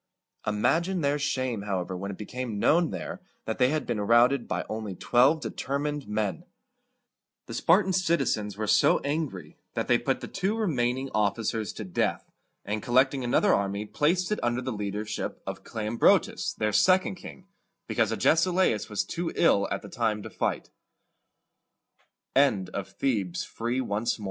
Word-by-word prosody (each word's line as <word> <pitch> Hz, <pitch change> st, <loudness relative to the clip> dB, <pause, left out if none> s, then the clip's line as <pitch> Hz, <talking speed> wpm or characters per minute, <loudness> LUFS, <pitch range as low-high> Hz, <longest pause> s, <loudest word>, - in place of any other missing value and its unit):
Imagine 170 Hz, -, +1 dB
their 145 Hz, 0 st, +1 dB
shame, 130 Hz, -6 st, -1 dB
however, 95 Hz, -2 st, -3 dB
when 100 Hz, +2 st, -5 dB
it 100 Hz, -, -6 dB
became 120 Hz, 0 st, -5 dB
known 165 Hz, +9 st, +3 dB
there -, -, -6 dB, 0.2 s
that 110 Hz, -, -3 dB
they 125 Hz, 0 st, +5 dB
had 155 Hz, +1 st, -1 dB
been 105 Hz, -, -2 dB
routed 120 Hz, +4 st, +4 dB
by -, -, -2 dB
only 110 Hz, -3 st, -5 dB
twelve 130 Hz, -, +3 dB
determined 145 Hz, +1 st, -3 dB
men! 105 Hz, -1 st, -2 dB, 1.0 s
The -, -, -8 dB
Spartan 190 Hz, -1 st, +3 dB
citizens 135 Hz, -, 0 dB
were 110 Hz, -, -2 dB
so 105 Hz, -, +4 dB
angry 150 Hz, +1 st, -4 dB, 0.2 s
that -, -, -1 dB
they -, -, +4 dB
put -, -, -1 dB
the -, -, -5 dB
two 195 Hz, +3 st, -1 dB
remaining 130 Hz, -, 0 dB
officers 110 Hz, +1 st, 0 dB
to -, -, -6 dB
death, 90 Hz, -3 st, -2 dB, 0.3 s
and, 105 Hz, +1 st, -2 dB
collecting 130 Hz, +2 st, +2 dB
another 160 Hz, +11 st, +3 dB
army, 100 Hz, +1 st, -1 dB
placed 175 Hz, -, +1 dB
it 210 Hz, -, 0 dB
under 120 Hz, +1 st, 0 dB
the 130 Hz, -, -3 dB
leadership 105 Hz, 0 st, -4 dB
of -, -, -6 dB
Cle 110 Hz, -2 st, -5 dB
om´bro 110 Hz, +2 st, +5 dB
tus, -, -, -5 dB
their 105 Hz, -1 st, -1 dB
second 185 Hz, -, +4 dB
king, 185 Hz, 0 st, -11 dB, 0.4 s
because 115 Hz, -2 st, +1 dB
Agesilaus 160 Hz, -, +2 dB
125 Hz, 130 wpm, -27 LUFS, 105-155 Hz, 1.0 s, they